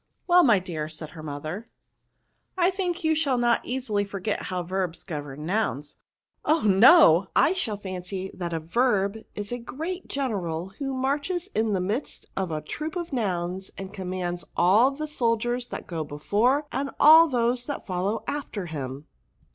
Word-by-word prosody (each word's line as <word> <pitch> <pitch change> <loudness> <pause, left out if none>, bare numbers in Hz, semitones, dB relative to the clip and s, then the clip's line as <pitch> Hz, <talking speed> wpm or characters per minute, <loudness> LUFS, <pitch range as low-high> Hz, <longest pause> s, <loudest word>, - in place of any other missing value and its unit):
'* - - -50
Well, 355 0 +6
my 235 -8 +6
dear," 165 -5 -4
said 155 0 -7
her 160 - -10
mother, 155 +8 -6 0.4
" - - -48
I 355 0 +4
o - - -1
3 - - -17
think 370 -2 -2
you 315 0 +3
will 270 -4 +1
not 240 -1 +2
easily 240 -5 -1
forget 200 +1 -3
how 180 -1 -3
vexhs 180 -1 -3
govern 150 -3 -6
nouns. 160 -7 -2 0.2
" - - -67 0.2
Oh! 315 +1 +2
no; 200 - +7
I 335 - +5
shall 235 - -2
fancy 185 0 -5
that 175 -2 -4
a 165 - -1
verb 200 +3 +1 0.2
is 205 +1 -5
a 245 - -3
great 325 +10 -5
general, 190 -11 -2
who 270 -2 -2
marches 290 +8 -1
in 220 -1 +1
the 190 - 0
midst 210 +10 -3
of 190 -2 -1
a 155 -1 -3
troop 310 +2 -5
of 345 -4 -4
nouns, 190 -5 -1
and 195 0 -7
commands 180 -2 -3
all 210 +9 +5
the 300 +3 -5
soldiers 240 -3 0
that - - -6
go 165 -3 -3
before, 215 - +1
and 275 +1 -2
all 320 +2 +9
those 245 -2 0
that 285 - -5
follow 190 +3 -2
after 260 -9 -4
him." 140 -3 -6
210 Hz, 180 wpm, -26 LUFS, 180-270 Hz, 0.4 s, all